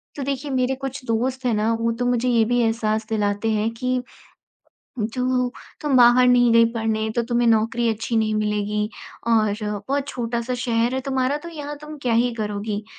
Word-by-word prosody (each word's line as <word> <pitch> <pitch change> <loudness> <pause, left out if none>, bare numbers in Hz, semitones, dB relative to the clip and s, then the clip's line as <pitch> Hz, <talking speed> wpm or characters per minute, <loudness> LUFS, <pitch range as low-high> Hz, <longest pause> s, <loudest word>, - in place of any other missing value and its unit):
तो 285 - -4
देखिए 275 +1 -3
मेरे 260 0 +1
कुछ 270 0 -6
दोस्त 250 +3 -1
हैं 240 - +2
ना 215 +2 +1
वो 230 - +1
तो 245 - 0
मुझे 245 0 +1
ये 230 -2 +3
भी 245 +2 +1
एहसास 220 -1 0
दिलाते 210 0 0
हैं 215 +1 +1
कि, 255 +1 -1 1.0
"जो 250 +3 0 0.3
तुम 290 -3 +1
बाहर 250 +1 +6
नहीं 245 -1 +5
गई 230 0 +6
पढ़ने 220 -1 -1
तो 235 - +2
तुम्हें 240 0 +1
नौकरी 230 +1 +2
अच्छी 225 +2 -3
नहीं 215 -1 +1
मिलेगी 210 0 -1 0.4
और 215 -2 +3 0.3
बहुत 280 0 -1
छोटा-सा 235 0 -3
शहर 235 +1 +1
है 265 - -1
तुम्हारा 265 +2 +1
तो - - -7
यहाँ 295 -2 -6
तुम 300 0 -8
क्या 245 -2 +1
ही 240 +1 +2
करोगी?" 210 -1 -3
235 Hz, 185 wpm, -22 LUFS, 220-255 Hz, 1.0 s, बाहर